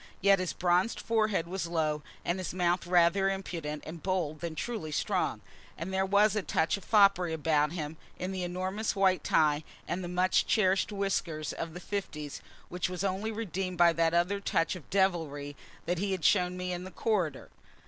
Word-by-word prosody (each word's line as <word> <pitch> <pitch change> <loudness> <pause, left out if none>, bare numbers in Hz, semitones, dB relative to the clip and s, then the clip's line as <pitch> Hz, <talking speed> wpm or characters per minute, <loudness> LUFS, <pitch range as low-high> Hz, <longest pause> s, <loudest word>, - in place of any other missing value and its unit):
Yet 195 0 +5
his 185 -2 -1
bronzed 180 +5 +1
forehead 215 -6 +1
was 180 0 -3
low, 155 -3 0 0.2
and 175 +2 0
his 185 -1 -4
mouth 175 -1 +1
rather 180 +2 +4
impudent 170 -6 -4
and 160 +1 -8
bold 175 -5 -1
than 170 -2 -4
truly 205 -4 -4
strong. - - -1 0.4
And 175 +4 -5
there 190 0 +1
was 205 +1 +4
a 210 - +1
touch 160 -3 +1
of 200 - -9
foppery 195 -5 +4
about 150 -1 +1
him, 155 -2 -5 0.2
in 185 +1 -3
the 190 -1 -3
enormous 185 +5 -2
white 190 -3 +3
tie 150 -1 +3 0.2
and 180 +2 -2
the - - -4
much 180 +1 +2
cherished 190 -2 +2
whiskers 180 -6 -2
of 165 0 -5
the - - -5
fifties, 170 -7 -5 0.3
which 180 0 -2
was 180 0 -4
only 200 +3 -1
redeemed 195 -4 -3
by 170 -1 +6
that 165 0 +2
other 180 +4 +2
touch 185 -3 0
of 175 - -11
devilry 160 -7 0 0.3
that 175 0 -1
he 195 0 0
had 180 -5 -3
shown 180 -2 +3
me 180 0 -3
in 175 0 -4
the 185 - -7
corridor. 185 - -1
180 Hz, 190 wpm, -30 LUFS, 165-195 Hz, 0.4 s, by